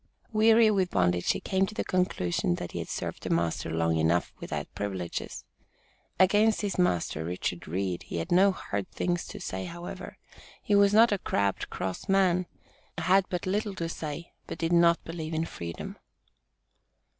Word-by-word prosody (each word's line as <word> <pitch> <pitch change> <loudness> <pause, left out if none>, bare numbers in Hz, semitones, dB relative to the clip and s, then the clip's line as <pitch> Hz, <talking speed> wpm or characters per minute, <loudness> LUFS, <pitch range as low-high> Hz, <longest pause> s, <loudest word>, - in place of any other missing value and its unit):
Weary 220 +1 +6
with 190 -3 +1
bondage 90 - +2
he - - -4
came 190 0 +1
to 215 - -9
the - - -1
conclusion 90 - 0
that 90 - -6
he - - -4
had - - -5
served - - -4
a - - -3
master 85 0 0
long 80 0 +1
enough 80 +2 +1
"without - - -4
privileges." 95 -4 -4 0.7
Against 205 +4 +4
his 200 -3 -2
master, 85 - +1
Richard 90 +1 -3
Reed, 90 +1 -2
he - - -6
had 80 - -4
no 190 +3 +6
hard 100 - -4
things 175 -1 -2
to 205 - -8
say, 95 - -4
however. 175 +1 -8 0.5
He 210 - 0
was 200 0 +6
not 225 +2 +6
a 205 - +1
"crabbed, 100 - -1
cross 95 - -4
man" 185 -2 +3 0.5
had 190 +1 +3
but 180 -1 -3
"little 205 +1 -1
to 170 -2 -3
say," 160 0 -6
but - - -6
"didn't 170 0 +3
believe 160 -1 -5
in 160 +1 0
freedom." 85 - -7
170 Hz, 170 wpm, -28 LUFS, -, 0.7 s, Weary